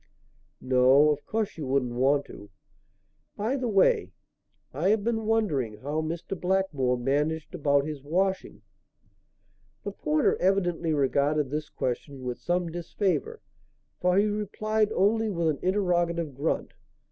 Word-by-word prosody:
"No, 130 +3 +5
of 145 -1 -3
course 220 -6 -2
you 145 - -4
wouldn't 130 -2 0
want 135 +4 +2
to. 100 - -12 0.9
By 220 +6 0
the 255 -3 -2
way, 190 - +3 0.6
I 165 +8 0
have 215 -1 +2
been 225 -1 -1
wondering 150 - 0
how 145 +7 -3
Mr. 165 +4 -4
Blackmore 180 -9 0
managed 150 +6 -1
about 145 -4 +2
his 150 -2 -5
washing." 190 +6 -1 1.2
The 200 - -4
porter 155 -5 +1
evidently 175 -3 +1
regarded 140 0 +1
this 150 +1 -3
question 130 +2 -4
with 125 -1 -4
some 175 -1 -1
disfavour, 195 - -2 0.6
for 180 +1 +2
he 205 - +4
replied 215 +1 -1
only 220 +3 +2
with 170 -4 0
an 150 - -2
interrogative 175 -5 0
grunt. 140 +5 -2
165 Hz, 135 wpm, -27 LUFS, 140-195 Hz, 1.2 s, No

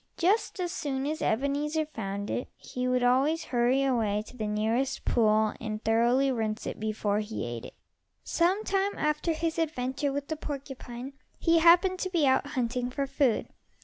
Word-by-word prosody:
Just 390 +4 +1
as 355 -1 -1
soon 275 -6 -2
as 310 +2 -2
Ebenezer 290 +6 0
found 205 -8 -5
it 245 - -3
he 250 0 -4
would 250 0 +1
always 275 +7 +3
hurry 250 +2 +2
away 220 -6 +1
to 250 - -13
the 215 -3 -3
nearest 225 +6 0
pool 215 -2 +3
and 215 -1 -3
thoroughly 240 +5 +3
rinse 220 -3 -2
it - - -5
before 215 -1 0
he 215 - -4
ate 120 0 -5
it. - - -11 0.5
Some 370 +5 +1
time 395 -1 0
after 300 +2 0
his 330 +1 -1
adventure 280 -2 -1
with 285 0 -3
the 315 - -2
porcupine, 270 -3 -7 0.2
he 330 -1 +3
happened 355 +3 +5
to 370 - -2
be 340 -5 +2
out 265 +1 +3
hunting 250 -2 -1
for 275 +2 -2
food. 270 -3 +1
265 Hz, 175 wpm, -28 LUFS, 225-310 Hz, 0.5 s, happened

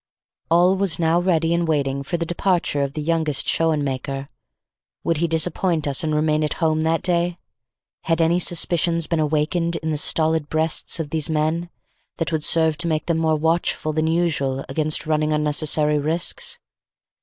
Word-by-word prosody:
All 175 +3 +4
was 190 -4 +1
now 165 0 +2
ready 170 -2 +1
and 170 0 0
waiting 140 -3 -1
for 170 +5 -3
the 170 - -3
departure 175 -4 0
of 140 -1 -2
the 150 - -4
youngest 160 -3 0
Schoenmaker. 140 -3 -1 0.7
Would 165 -2 0
he 170 +2 0
disappoint 165 0 0
us 140 +2 +2
and 155 -1 -1
remain 155 0 +1
at 150 - -1
home 155 -1 0
that 160 +1 0
day? 175 -1 0 0.7
Had 165 0 0
any 165 +2 +2
suspicions 170 -1 +1
been 165 -1 -1
awakened 155 +3 0
in 160 -1 -3
the 150 - -1
stolid 160 0 +2
breasts 160 +1 -1
of 150 -3 -4
these 160 0 -1
men, 160 +2 -1 0.5
that 165 - -2
would 155 -2 -1
serve 160 -2 +2
to 175 - +1
make 155 -2 -1
them 165 -2 0
more 160 -1 +1
watchful 160 0 -1
than 155 +1 0
usual 155 -5 -1
against 155 +3 -1
running 155 0 0
unnecessary 150 0 +2
risks? 160 +4 +1
160 Hz, 170 wpm, -21 LUFS, 150-170 Hz, 0.7 s, All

